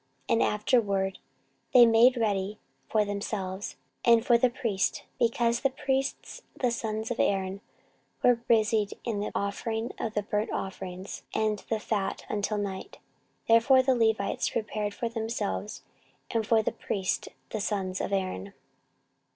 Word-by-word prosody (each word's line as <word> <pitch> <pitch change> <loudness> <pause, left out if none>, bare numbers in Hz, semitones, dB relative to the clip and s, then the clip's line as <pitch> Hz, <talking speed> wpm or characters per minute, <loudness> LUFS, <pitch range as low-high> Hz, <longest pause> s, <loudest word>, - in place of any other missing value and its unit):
14:035:014 - - +4
And 230 - +4
afterward 200 -3 +1 0.6
they 245 -1 +10
made 235 +3 +6
ready 205 -2 0 0.3
for 215 -1 +3
themselves, 200 -1 -4 0.3
and 235 -1 +5
for 245 -4 +5
the 245 +2 +4
priests: 230 -6 -1 0.2
because 235 0 +2
the 275 - +2
priests 270 0 -2 0.2
the 250 -2 +2
sons 220 -1 -3
of 245 - -3
Aaron 195 0 0 0.6
were 245 - +6
busied 220 -3 +2
in 210 -3 -2
offering 220 +3 -2
of 220 -1 -3
burnt 210 +1 -1
offerings 190 0 -5
and 215 -1 +1
the 225 - 0
fat 210 -2 -2
until 210 0 -1
night; 200 - -4 0.5
therefore 230 +3 +6
the 260 0 +3
Levites 220 -4 +1
prepared 210 -1 -2
for 235 - -2
themselves, 220 -2 -3 0.5
and 225 -3 0
for 225 -1 +4
the - - 0
priests 190 -2 -2 0.2
the 215 - -2
sons 190 -3 -2
of - - -3
Aaron. 185 - -2
215 Hz, 140 wpm, -28 LUFS, 200-230 Hz, 0.6 s, they